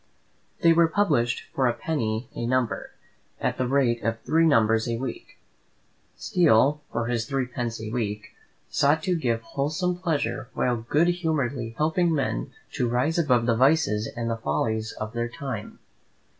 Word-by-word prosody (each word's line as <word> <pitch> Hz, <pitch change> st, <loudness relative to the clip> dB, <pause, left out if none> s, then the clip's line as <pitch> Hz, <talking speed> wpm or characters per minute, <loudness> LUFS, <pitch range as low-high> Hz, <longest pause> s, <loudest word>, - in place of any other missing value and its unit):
They 165 Hz, -1 st, +7 dB
were 165 Hz, 0 st, +5 dB
published 150 Hz, -10 st, +1 dB
for 130 Hz, -2 st, +2 dB
a 120 Hz, -, +1 dB
penny 120 Hz, -7 st, -2 dB
a 115 Hz, -, -3 dB
number, 130 Hz, -2 st, 0 dB, 0.5 s
at -, -, -1 dB
the 130 Hz, -, +1 dB
rate 125 Hz, -3 st, +2 dB
of 115 Hz, +1 st, -1 dB
three 165 Hz, +1 st, +3 dB
numbers 115 Hz, -5 st, +3 dB
a 115 Hz, -, -1 dB
week. 125 Hz, 0 st, -6 dB, 0.8 s
Steele, 150 Hz, -3 st, +3 dB
for 115 Hz, -, -1 dB
his 115 Hz, -1 st, -1 dB
threepence 125 Hz, -4 st, -2 dB
a 110 Hz, 0 st, -6 dB
week, 105 Hz, -3 st, -3 dB, 0.4 s
sought 145 Hz, +3 st, +2 dB
to 185 Hz, -2 st, +1 dB
give 120 Hz, -8 st, -1 dB
wholesome 165 Hz, +4 st, -2 dB
pleasure 150 Hz, -7 st, -2 dB
while 125 Hz, -1 st, +1 dB
good 145 Hz, +9 st, +2 dB
humouredly 140 Hz, -9 st, -1 dB
helping 160 Hz, +2 st, +2 dB
men 60 Hz, -, -2 dB, 0.2 s
to 120 Hz, -, 0 dB
rise 130 Hz, +8 st, +1 dB
above 125 Hz, -7 st, +3 dB
the 115 Hz, -1 st, +2 dB
vices 130 Hz, -5 st, +3 dB
and 115 Hz, -1 st, -2 dB
the 115 Hz, -1 st, -1 dB
follies 110 Hz, +4 st, -1 dB
of 110 Hz, +1 st, -6 dB
their 120 Hz, 0 st, -2 dB
time. 120 Hz, -4 st, -6 dB
125 Hz, 155 wpm, -25 LUFS, 115-155 Hz, 0.8 s, They